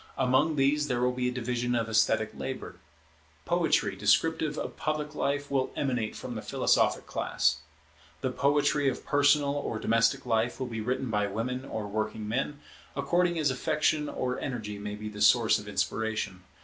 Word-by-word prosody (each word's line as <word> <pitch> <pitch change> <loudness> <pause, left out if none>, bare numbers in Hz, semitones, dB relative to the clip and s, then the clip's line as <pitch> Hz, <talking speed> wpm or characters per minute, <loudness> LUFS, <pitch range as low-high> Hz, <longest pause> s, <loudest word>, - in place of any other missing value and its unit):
Among 130 +4 +2
these 145 +2 +2
there 125 -3 0
will 125 0 +3
be 125 0 -1
a - - -3
division 120 0 -1
of 115 -1 0
esthetic 110 -1 +2
labour. - - -6 0.7
Poetry - - +2
descriptive 160 -2 +2
of - - -4
public 155 -1 -2
life 145 0 -1
will 135 -2 +1
emanate 125 -6 -1
from - - -6
the - - -5
philosophic - - +2
class. - - 0 0.6
The 130 - -1
poetry 145 +1 +2
of 125 - -6
personal 145 0 +3
or 145 -6 -3
domestic 115 +5 +2
life 115 0 0
will 130 - -1
be 115 -3 -4
written 125 +1 -2
by 105 -1 +1
women 125 +6 -3
or 110 -5 -4
working 110 +1 -3
men, 135 +6 -2 0.3
according 175 -1 +1
as 150 -4 +2
affection 150 +3 0
or 125 -1 -2
energy 110 -6 -4
may 105 0 -5
be 105 +1 -7
the 105 -1 -7
source 110 +1 +5
of 105 - -10
inspiration. 110 -2 -2
125 Hz, 170 wpm, -29 LUFS, 110-145 Hz, 0.7 s, source